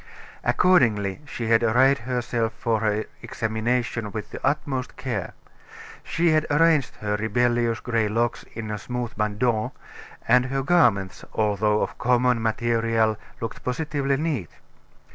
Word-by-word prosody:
Accordingly, 115 Hz, -, +3 dB
she 120 Hz, -, -5 dB
had 115 Hz, 0 st, +5 dB
arrayed 125 Hz, +4 st, +4 dB
herself 120 Hz, -2 st, -1 dB
for 115 Hz, -2 st, -1 dB
her 105 Hz, 0 st, 0 dB, 0.2 s
examination 115 Hz, 0 st, -2 dB
with 110 Hz, -1 st, -6 dB
the -, -, -8 dB
utmost 135 Hz, -3 st, -1 dB
care. 115 Hz, -9 st, -4 dB, 0.7 s
She 170 Hz, 0 st, +1 dB
had 155 Hz, 0 st, +2 dB
arranged 150 Hz, -2 st, +3 dB
her 105 Hz, 0 st, -1 dB
rebellious 120 Hz, +2 st, +1 dB
gray 115 Hz, -2 st, 0 dB
locks 115 Hz, +2 st, 0 dB
in 110 Hz, -1 st, -4 dB
smooth 125 Hz, +2 st, -4 dB
bandeaux, 110 Hz, +1 st, 0 dB, 0.5 s
and 125 Hz, +2 st, +5 dB
her 135 Hz, +1 st, -1 dB
garments, 120 Hz, -, +2 dB
although 105 Hz, 0 st, +1 dB
of -, -, -5 dB
common 125 Hz, -1 st, +2 dB
material, 115 Hz, -1 st, +1 dB, 0.2 s
looked 115 Hz, -2 st, -6 dB
positively 140 Hz, 0 st, -1 dB
neat. 140 Hz, -, -2 dB
115 Hz, 125 wpm, -24 LUFS, 110-130 Hz, 0.7 s, had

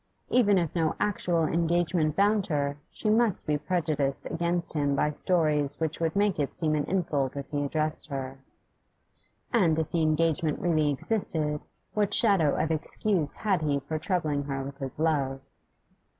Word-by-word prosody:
Even 205 Hz, -5 st, +4 dB
if 170 Hz, -4 st, 0 dB
no 165 Hz, -3 st, 0 dB
actual 180 Hz, -5 st, 0 dB
engagement 165 Hz, -1 st, +1 dB
bound 205 Hz, 0 st, +2 dB
her, 145 Hz, -4 st, -1 dB
she -, -, -6 dB
must 220 Hz, -2 st, +2 dB
be 150 Hz, -, +1 dB
prejudiced 150 Hz, -4 st, -1 dB
against 170 Hz, +1 st, -1 dB
him 145 Hz, -2 st, +1 dB
by 150 Hz, +2 st, +1 dB
stories 150 Hz, -3 st, 0 dB
which 160 Hz, -1 st, -2 dB
would 165 Hz, +1 st, -1 dB
make 200 Hz, -4 st, +1 dB
it 145 Hz, -, -1 dB
seem 155 Hz, -2 st, +1 dB
an 150 Hz, -1 st, 0 dB
insult 150 Hz, -8 st, 0 dB
if 140 Hz, -1 st, -5 dB
he 145 Hz, -1 st, -1 dB
addressed 155 Hz, +2 st, -1 dB
her. 135 Hz, -2 st, -5 dB, 1.1 s
And 175 Hz, -9 st, +3 dB
if 160 Hz, -2 st, -2 dB
the 170 Hz, -, +1 dB
engagement 155 Hz, -1 st, +1 dB
really 155 Hz, -4 st, +1 dB
existed, 150 Hz, -2 st, -1 dB, 0.3 s
what 210 Hz, -2 st, +2 dB
shadow 195 Hz, -10 st, +4 dB
of 160 Hz, +1 st, 0 dB
excuse 160 Hz, +1 st, 0 dB
had 195 Hz, -6 st, 0 dB
he 145 Hz, -2 st, +1 dB
for 155 Hz, +3 st, -4 dB
troubling 155 Hz, -5 st, -1 dB
her 135 Hz, -1 st, -3 dB
with 140 Hz, +1 st, -8 dB
his 135 Hz, -2 st, -4 dB
love? 145 Hz, -4 st, 0 dB
155 Hz, 165 wpm, -27 LUFS, 145-175 Hz, 1.1 s, Even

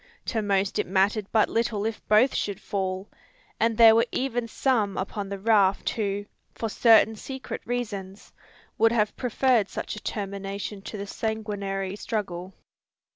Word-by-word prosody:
To 225 Hz, -, +1 dB
most 200 Hz, -1 st, 0 dB
it -, -, 0 dB
mattered 195 Hz, +2 st, +1 dB
but 220 Hz, -2 st, +4 dB
little 225 Hz, -2 st, -1 dB
if 225 Hz, -1 st, -3 dB
both 220 Hz, +6 st, +5 dB
should 200 Hz, -1 st, -2 dB
fall; 190 Hz, 0 st, -3 dB, 0.5 s
and 225 Hz, 0 st, +2 dB
there 225 Hz, -1 st, +9 dB
were 230 Hz, +2 st, +3 dB
even 245 Hz, -3 st, -1 dB
some 225 Hz, -6 st, 0 dB
upon 200 Hz, +1 st, -4 dB
the 200 Hz, -, -4 dB
raft 200 Hz, -2 st, +3 dB
who, 205 Hz, -2 st, -2 dB, 0.3 s
for 225 Hz, -, -3 dB
certain 225 Hz, 0 st, +5 dB
secret 265 Hz, +4 st, -6 dB
reasons, 205 Hz, -5 st, -5 dB, 0.5 s
would 225 Hz, +1 st, +5 dB
have 210 Hz, -3 st, +1 dB
preferred 245 Hz, -3 st, +2 dB
such -, -, -5 dB
a 215 Hz, -, -9 dB
termination 200 Hz, 0 st, -5 dB
to 210 Hz, -, -7 dB
the 200 Hz, -, -5 dB
sanguinary 200 Hz, -3 st, -3 dB
struggle. 190 Hz, -4 st, -4 dB
210 Hz, 150 wpm, -26 LUFS, 195-225 Hz, 0.5 s, there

